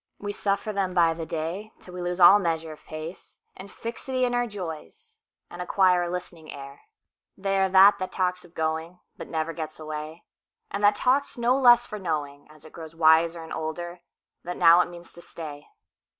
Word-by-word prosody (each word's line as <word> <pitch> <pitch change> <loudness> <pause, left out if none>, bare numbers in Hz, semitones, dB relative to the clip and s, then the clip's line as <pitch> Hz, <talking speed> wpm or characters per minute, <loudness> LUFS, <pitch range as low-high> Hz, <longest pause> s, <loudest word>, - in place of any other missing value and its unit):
We 205 0 -5
suffer 200 +1 -1
them 190 -2 -2
by 165 -2 +4
the 165 -1 -7
dayTill 180 +4 -6
we 180 - -6
lose 175 +1 -3
all 190 +3 +8
measure 165 -3 -2
of 155 - -13
pace, 155 +3 -9 0.2
And 195 +1 -11
fixity 255 +3 -3
in 245 - -1
our 245 0 +1
joys, 205 - -9 0.3
And 175 - -9
acquire 180 -1 +3
a 175 - -2
listening 175 -3 -7
air. 140 0 -10 0.6
They 195 0 0
are 190 0 +2
that 195 +2 +7
that 185 - -4
talks 180 -1 -1
of 175 0 -19
goingBut 160 +2 -5
never 160 0 -3
gets 155 -1 -7
away; 155 +1 -7 0.5
And 200 +1 -4
that 205 0 +5
talks 270 +5 +1
no 240 +2 +2
less 240 -3 +6
for 210 - -7
knowing, 150 -5 -4
As 155 0 -17
it 155 - -14
grows 165 -1 -10
wiser 165 +1 +4
and 160 - -8
older, 175 +2 -5 0.4
That 180 +1 -5
now 170 +1 +7
it - - -2
means 175 0 -11
to 175 - -12
stay. 150 -4 -9
175 Hz, 190 wpm, -26 LUFS, 160-200 Hz, 0.6 s, all